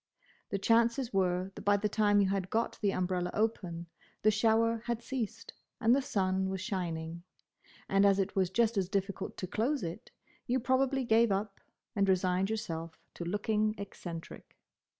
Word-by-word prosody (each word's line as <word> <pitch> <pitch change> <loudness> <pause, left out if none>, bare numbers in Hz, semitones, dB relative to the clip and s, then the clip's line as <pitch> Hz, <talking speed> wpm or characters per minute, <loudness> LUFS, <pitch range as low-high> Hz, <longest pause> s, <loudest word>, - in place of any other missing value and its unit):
The 200 - -1
chances 230 +4 +2
were 185 0 +1
that - - -9
by 205 0 +3
the 210 +1 0
time 205 -1 +3
you 195 - +2
had 195 -1 -1
got 230 +3 -1
the 205 - +2
umbrella 180 -1 -1
open, 185 -6 -1 0.4
the 215 - +6
shower 225 +1 +2
had 235 -1 -2
ceased 230 -4 -4 0.3
and 230 +3 +5
the 280 - +2
sun 190 -5 0
was 190 0 -3
shining; 170 -5 -3 0.7
and 195 0 +3
as 200 -1 +5
it 195 0 -1
was 190 -2 +2
just 230 +2 +2
as 185 -2 -1
difficult 195 0 -2
to - - -3
close 235 +10 -1
it, 170 +8 -6 0.4
you 255 +2 +2
probably 265 +2 +1
gave 230 -1 +4
up, 195 +1 -2 0.4
and 200 -2 +2
resigned 185 +1 +2
yourself 165 -7 -4 0.2
to - - -6
looking 210 +4 0
eccentric. 175 -4 -8
200 Hz, 170 wpm, -32 LUFS, 185-225 Hz, 0.7 s, the